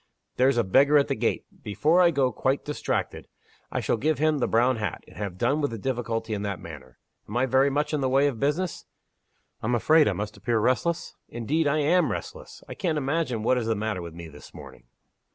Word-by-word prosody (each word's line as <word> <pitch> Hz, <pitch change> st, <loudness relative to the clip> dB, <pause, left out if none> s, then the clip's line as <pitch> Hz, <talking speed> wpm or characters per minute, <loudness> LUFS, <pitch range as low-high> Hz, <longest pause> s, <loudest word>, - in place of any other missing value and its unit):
There's 130 Hz, +1 st, +3 dB
a 120 Hz, -, +3 dB
beggar 140 Hz, +9 st, +4 dB
at 140 Hz, -, +2 dB
the -, -, 0 dB
gate. -, -, -1 dB, 0.2 s
Before 155 Hz, -, +2 dB
I 175 Hz, -, +6 dB
go 135 Hz, -5 st, +1 dB
quite 135 Hz, +2 st, -1 dB
distracted, 150 Hz, -, -3 dB, 0.4 s
I -, -, -1 dB
shall -, -, 0 dB
give 150 Hz, +5 st, 0 dB
him 155 Hz, +1 st, +1 dB
the -, -, +1 dB
brown 120 Hz, +2 st, +2 dB
hat, 105 Hz, -5 st, -4 dB
and -, -, -16 dB
have 100 Hz, -4 st, -5 dB
done 145 Hz, +10 st, +1 dB
with 145 Hz, -, 0 dB
the 115 Hz, -, -6 dB
difficulty 115 Hz, -1 st, -3 dB
in 100 Hz, -, -3 dB
that 100 Hz, -2 st, -3 dB
manner. 70 Hz, -6 st, -11 dB, 0.3 s
Am 110 Hz, -, -3 dB
I 125 Hz, -, +3 dB
very 130 Hz, +2 st, +3 dB
much 150 Hz, +2 st, -1 dB
in 150 Hz, -, 0 dB
the 130 Hz, -, +1 dB
way 135 Hz, +2 st, +3 dB
of 135 Hz, -6 st, -1 dB
business? 155 Hz, +6 st, -1 dB, 0.8 s
I'm 120 Hz, +3 st, 0 dB
afraid 155 Hz, +6 st, +4 dB
I -, -, +1 dB
must 105 Hz, +1 st, -5 dB
appear 120 Hz, -2 st, 0 dB
restless? 130 Hz, +9 st, 0 dB, 0.2 s
Indeed, 145 Hz, +7 st, -1 dB
I 145 Hz, +2 st, +2 dB
am 175 Hz, +5 st, +3 dB
restless. -, -, -7 dB
I -, -, -7 dB
can't 165 Hz, -5 st, -1 dB
imagine 140 Hz, -5 st, -1 dB
what 125 Hz, +2 st, +2 dB
is 115 Hz, -, -3 dB
the 115 Hz, -, +1 dB
matter 105 Hz, -3 st, -3 dB
with 85 Hz, -1 st, -8 dB
me 85 Hz, -1 st, -8 dB
this 75 Hz, -2 st, -14 dB
morning." -, -, -12 dB
130 Hz, 225 wpm, -26 LUFS, 110-150 Hz, 0.8 s, I